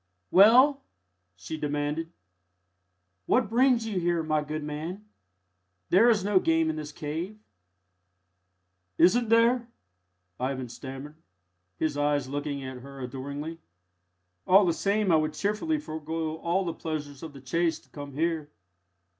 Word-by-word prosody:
"Well!" 255 Hz, +9 st, +7 dB, 0.5 s
she 90 Hz, -, -7 dB
demanded, 150 Hz, +2 st, -2 dB, 1.2 s
"what 230 Hz, -4 st, +2 dB
brings 245 Hz, -1 st, +3 dB
you 210 Hz, -4 st, -2 dB
here, 170 Hz, -1 st, 0 dB
my 155 Hz, -1 st, 0 dB
good 155 Hz, +1 st, -4 dB
man? 160 Hz, +7 st, -5 dB, 0.9 s
There 215 Hz, +7 st, +6 dB
is 215 Hz, -5 st, +3 dB
no 200 Hz, -1 st, +3 dB
game 160 Hz, -2 st, +2 dB
in -, -, -6 dB
this 150 Hz, -1 st, -6 dB
cave." 160 Hz, +8 st, -5 dB, 1.6 s
"Isn't 230 Hz, +6 st, +4 dB
there?" 230 Hz, +1 st, +4 dB, 0.7 s
Ivan 130 Hz, -1 st, -3 dB
stammered, 135 Hz, +4 st, -9 dB, 0.6 s
his 155 Hz, -2 st, -1 dB
eyes 145 Hz, -2 st, +1 dB
looking 140 Hz, 0 st, -4 dB
at 130 Hz, -1 st, -7 dB
her 135 Hz, +2 st, -11 dB
adoringly. 140 Hz, +5 st, -6 dB, 0.9 s
"All 195 Hz, +2 st, +7 dB
the 170 Hz, -, +2 dB
same 200 Hz, +2 st, +1 dB
I 160 Hz, -, +6 dB
would 155 Hz, 0 st, 0 dB
cheerfully 210 Hz, -, -1 dB
forgo 160 Hz, -, -4 dB
all 180 Hz, +3 st, 0 dB
the 170 Hz, -, -2 dB
pleasures 150 Hz, -4 st, -5 dB
of 160 Hz, -3 st, -8 dB
the 140 Hz, -, -11 dB
chase 165 Hz, +5 st, 0 dB
to -, -, -23 dB
come 145 Hz, -1 st, -9 dB
here." 160 Hz, 0 st, -1 dB
160 Hz, 135 wpm, -27 LUFS, 145-195 Hz, 1.6 s, Well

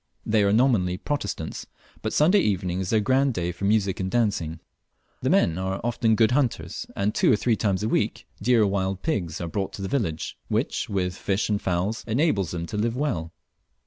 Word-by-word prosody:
They 105 Hz, -1 st, +3 dB
are 100 Hz, 0 st, +3 dB
nominally 105 Hz, -6 st, +3 dB
Protestants, 145 Hz, -, -4 dB, 0.3 s
but -, -, -2 dB
Sunday 175 Hz, +7 st, +4 dB
evening 95 Hz, -, 0 dB
is 95 Hz, -1 st, -3 dB
their 110 Hz, -2 st, +3 dB
grand 130 Hz, +2 st, +2 dB
day 85 Hz, -1 st, -1 dB
for 90 Hz, +3 st, -5 dB
music 100 Hz, -2 st, +2 dB
and 95 Hz, 0 st, -1 dB
dancing. 95 Hz, -8 st, 0 dB, 0.6 s
The -, -, 0 dB
men 85 Hz, +1 st, +3 dB
are 95 Hz, +1 st, -2 dB
often 115 Hz, -1 st, +2 dB
good 110 Hz, +1 st, +4 dB
hunters; 130 Hz, -2 st, -1 dB
and 100 Hz, +2 st, 0 dB
two -, -, +3 dB
or -, -, +6 dB
three 115 Hz, +2 st, +1 dB
times 100 Hz, -2 st, 0 dB
a -, -, +1 dB
week, -, -, 0 dB, 0.2 s
deer 115 Hz, +1 st, +4 dB
or -, -, +3 dB
wild 95 Hz, -1 st, -1 dB
pigs 90 Hz, -, -1 dB
are 85 Hz, -, -3 dB
brought 95 Hz, +3 st, -3 dB
to 100 Hz, -, -6 dB
the -, -, -2 dB
village, 95 Hz, -, -2 dB
which, -, -, -1 dB
with 90 Hz, -3 st, -1 dB
fish 100 Hz, +1 st, -1 dB
and 105 Hz, -1 st, 0 dB
fowls, 95 Hz, +5 st, -1 dB
enables 110 Hz, -, +1 dB
them 85 Hz, -1 st, -4 dB
to 105 Hz, -, -5 dB
live 115 Hz, +3 st, 0 dB
well. 85 Hz, -, -2 dB
100 Hz, 205 wpm, -25 LUFS, 90-115 Hz, 0.6 s, or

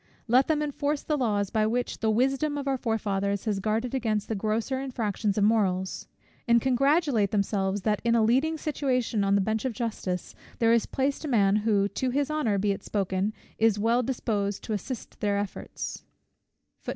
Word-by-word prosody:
Let 250 Hz, +4 st, +4 dB
them 300 Hz, -1 st, +1 dB
enforce 290 Hz, 0 st, -2 dB
the 305 Hz, -, 0 dB
laws 210 Hz, -7 st, 0 dB
by 215 Hz, -1 st, +2 dB
which 245 Hz, +2 st, -2 dB
the 220 Hz, -, +1 dB
wisdom 270 Hz, +6 st, +1 dB
of 280 Hz, -1 st, -4 dB
our 270 Hz, -1 st, 0 dB
forefathers 200 Hz, -4 st, -1 dB
has 210 Hz, -3 st, 0 dB
guarded 220 Hz, +5 st, -1 dB
against 220 Hz, -5 st, -1 dB
the -, -, 0 dB
grosser 220 Hz, +5 st, -1 dB
infractions 220 Hz, -6 st, -2 dB
of 205 Hz, -, +3 dB
morals; 190 Hz, -4 st, +1 dB, 0.4 s
and 235 Hz, 0 st, +5 dB
congratulate 265 Hz, -, +2 dB
themselves, 200 Hz, -1 st, 0 dB
that 210 Hz, -2 st, +1 dB
in 235 Hz, 0 st, +3 dB
a 225 Hz, -, +4 dB
leading 270 Hz, +8 st, +2 dB
situation 255 Hz, -8 st, 0 dB
on 195 Hz, 0 st, +3 dB
the 200 Hz, -, +3 dB
bench 220 Hz, +2 st, -1 dB
of 260 Hz, -3 st, -1 dB
justice 200 Hz, -5 st, -3 dB, 0.2 s
there 230 Hz, 0 st, +4 dB
is 235 Hz, -, +2 dB
placed 275 Hz, +3 st, -1 dB
a -, -, -3 dB
man 205 Hz, -6 st, +3 dB
who, 210 Hz, -2 st, +2 dB
to 255 Hz, +5 st, -2 dB
his 285 Hz, +3 st, 0 dB
honour 245 Hz, -10 st, +1 dB
be 200 Hz, +1 st, +1 dB
it 195 Hz, -, -3 dB
spoken, 195 Hz, 0 st, -1 dB, 0.3 s
is 220 Hz, -2 st, +4 dB
well 230 Hz, +4 st, +2 dB
disposed 210 Hz, -5 st, -2 dB
to 220 Hz, -, -3 dB
assist 225 Hz, +4 st, -6 dB
their 205 Hz, -1 st, +1 dB
efforts. 200 Hz, -1 st, -5 dB
225 Hz, 185 wpm, -27 LUFS, 205-260 Hz, 0.4 s, and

